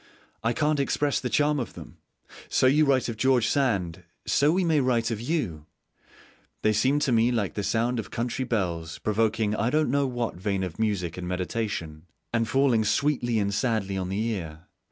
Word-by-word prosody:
'I 115 +1 +1
can't 150 +1 +1
express 140 +1 +1
the 125 - -3
charm 150 +1 +2
of 120 - -4
them' - - -11 0.5
(so - - +2
you 150 +4 +5
write 135 -2 +2
of 115 -2 -4
George 130 -2 +3
Sand; 95 -11 0 0.2
so 145 +2 +3
we 185 +2 +1
may 160 -3 +3
write 120 -3 +1
of 110 -1 -3
you): 105 - -2 1.0
'they 110 - +3
seem 130 +7 +2
to 145 -3 +1
me 115 +1 +3
like 110 -6 -1
the 105 - -3
sound 115 +4 0
of 110 - -5
country 120 +2 -2
bells, 85 -9 -2
provoking 110 0 0
I 115 +3 0
don't 150 -1 +1
know 140 0 +2
what 120 -2 -2
vein 95 0 -1
of 90 0 -6
music 95 -6 -1
and 90 -1 -5
meditation, 90 -4 -3 0.3
and 115 -1 +1
falling 135 -5 +3
sweetly 120 0 +1
and 100 -1 0
sadly 105 -4 0
on 95 -1 -3
the 100 +4 -1
ear.' 80 -7 -5
115 Hz, 190 wpm, -26 LUFS, 100-130 Hz, 1.0 s, you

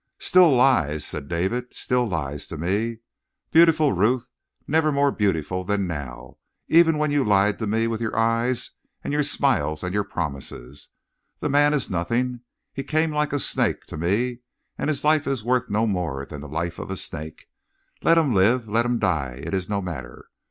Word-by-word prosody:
"Still 180 -2 +5
lies?" 120 - +3
said 70 - -5
David. 95 +10 -2
"Still 125 -2 +1
lies 75 -5 -3
to 80 - -7
me? 105 +8 -2 0.5
Beautiful 160 -4 +5
Ruth 120 +6 +1 0.4
never 155 +1 +2
more 140 0 +2
beautiful 95 - -1
than 100 +1 0
now, 65 -7 -7 0.3
even 165 -1 +5
when 150 -1 0
you 145 -1 +2
lied 100 -1 +2
to 110 - -2
me 110 +2 +1
with 115 0 -2
your 115 - -3
eyes 115 +2 +1 0.3
and - - -3
your 150 - +2
smiles 130 - 0
and 90 0 -3
your 105 0 +1
promises! 70 -7 -6 0.5
The 150 - -3
man 145 +1 +4
is 140 - -1
nothing. 120 +8 -1 0.3
He 135 - -4
came 155 +2 0
like 150 0 0
a 145 - 0
snake - - +1
to - - -9
me, 115 +9 0 0.4
and - - -3
his 150 -3 -1
life 150 -1 +2
is 135 -5 -1
worth 125 +1 0
no 110 +2 +1
more 85 -10 -2
than 75 0 -9
the 75 - -9
life 85 +3 -3
of - - -7
a - - -3
snake. 80 +1 -5 0.6
Let 165 - +4
him 150 -7 +3
live, 110 +5 +3
let 115 +3 +1
him 120 0 +1
die; 70 - -1
it - - -5
is 95 -1 -2
no 100 -1 -1
matter. 75 -9 -8
110 Hz, 185 wpm, -23 LUFS, 85-135 Hz, 0.6 s, Still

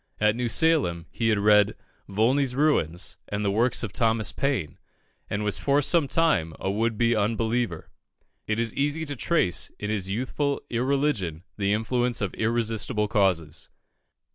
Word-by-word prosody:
At 105 0 +3
New 120 0 -1
Salem, 115 - +2
he 115 -1 0
had 110 - +3
read 105 0 +4 0.3
"Volney's 125 +6 +1
Ruins" 90 - 0
and 105 0 -2
the 100 - +2
works 120 +5 +1
of 105 -4 -4
Thomas 110 -3 +1
Paine, 130 - -2 0.5
and 105 +1 -2
was 105 -2 0
for 140 +1 +2
some 150 +1 +2
time 135 - +1
a 95 - -1
would 110 +2 0
be 120 +1 +2
unbeliever. 110 -3 -1 0.6
It 110 +1 -1
is 115 -2 0
easy 145 +3 -1
to 145 -2 -5
trace 125 - +1
in 105 0 -4
his 95 -3 -1
youthful 130 +6 -1
irreligion 120 - 0
the 100 -1 0
influence 120 +3 0
of 100 - -2
irresistible 110 -1 0
causes. 90 -7 0
110 Hz, 155 wpm, -26 LUFS, 100-130 Hz, 0.6 s, read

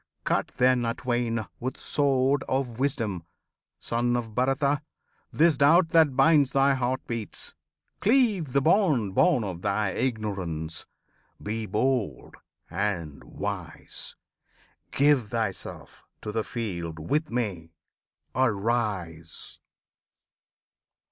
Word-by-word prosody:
Cut - - +1
then 125 -1 +4
atwain 115 -1 -1
With 130 +2 -4
sword 135 -1 +1
of 130 -3 -1
wisdom, 115 -10 -1 0.5
Son 120 +1 0
of 115 -2 -5
Bharata! 135 +3 +1 0.5
This 165 0 +4
doubt 160 +4 +5
that 160 -5 +4
binds 140 0 +4
thy 135 0 +4
heart 130 0 -1
beats! 115 -3 -4 0.5
cleave 215 - +3
the 140 -1 +3
bond 155 - +3
Born 150 - +4
of 90 -4 -5
thy 100 0 0
ignorance! 95 -11 -2 0.5
Be 110 +1 -3
bold 110 - -1 0.3
and 85 -7 -3
wise! - - -4 0.7
Give 140 -6 +3
thyself 110 -4 -4 0.2
to 105 - -4
the 110 0 -1
field 85 -10 -4
with 155 +2 +1
me! 95 -9 -3 0.6
Arise! 105 -8 -1
120 Hz, 100 wpm, -27 LUFS, 105-140 Hz, 0.7 s, doubt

